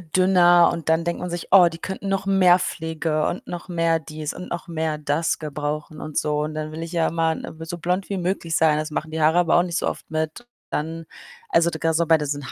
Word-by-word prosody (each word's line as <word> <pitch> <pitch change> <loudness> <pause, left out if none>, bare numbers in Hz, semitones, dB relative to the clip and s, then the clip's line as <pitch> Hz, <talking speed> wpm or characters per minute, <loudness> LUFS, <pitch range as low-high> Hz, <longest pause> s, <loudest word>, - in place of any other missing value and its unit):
dünner 175 -2 +6
und 165 -1 -5
dann 160 +1 +2
denkt 170 - -2
man 180 - -3
sich: 175 -1 -5
„Oh, 185 -2 +8
die 165 - -8
könnten 190 +2 -5
noch 195 0 -1
mehr 185 -2 +5
Pflege 160 -2 -2
und - - -5
noch 175 +1 -7
mehr 165 -1 +1
dies 155 0 -6
und 180 - -8
noch 175 +1 -5
mehr 160 -2 -2
das 150 +2 -1
gebrauchen 150 0 -4
und 155 - -5
so“, 150 0 0
und 155 0 -5
dann 155 0 -4
will 160 +1 -5
ich 165 - -7
ja 165 -2 +2
immer 165 0 +1
n - - -7
äh, 160 0 -9
so 170 +1 -5
blond 180 +3 -2
wie 200 - -2
möglich 175 -2 -2
sein. 155 -2 +4
Das 155 +1 -3
machen 155 +1 -4
die 160 0 -2
Haare 160 +2 +4
aber 175 -2 +3
auch 175 - +4
nicht 175 -1 -3
so - - -1
oft - - -5
mit. 155 +8 -3 0.3
Dann, 165 +2 -3 0.4
also, 170 - +3
d 160 - -6
grad 165 -1 +1
so 170 +1 +2
bei 160 0 +5
diesen 145 -3 -4
165 Hz, 255 wpm, -23 LUFS, 155-175 Hz, 0.4 s, Oh